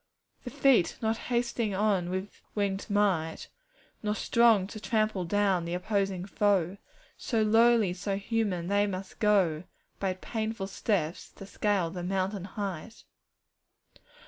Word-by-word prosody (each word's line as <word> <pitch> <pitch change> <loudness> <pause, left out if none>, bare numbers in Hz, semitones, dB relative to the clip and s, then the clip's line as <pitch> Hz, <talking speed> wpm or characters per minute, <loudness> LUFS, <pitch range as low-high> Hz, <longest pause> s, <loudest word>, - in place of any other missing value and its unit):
'The - - -4
"feet," 255 -11 +3
not 220 0 +1
hasting 235 -4 0
on 195 -3 +1
with 190 +2 -5 0.2
wingèd 200 0 -1
might, 195 -6 0 0.5
Nor 210 -1 -1
strong 225 -3 +4
to 215 +2 -8
trample 215 -4 0
down 195 -1 +1
the 170 +1 -3
opposing 195 -1 -1
foe; 195 -3 +1 0.4
So 225 -3 0
lowly, 225 -1 +4
and 180 - -5
so 195 +1 -2
human, 200 -4 -1
they 205 +2 +2
must 190 -1 -6
go 190 -7 +3 0.4
By 190 -2 0
painful 220 +1 -4
steps 195 -4 -2
to 195 - -10
scale 195 -4 0
the 180 - -5
mountain 190 +1 -2
height. 200 +1 -6
200 Hz, 135 wpm, -29 LUFS, 185-215 Hz, 0.5 s, strong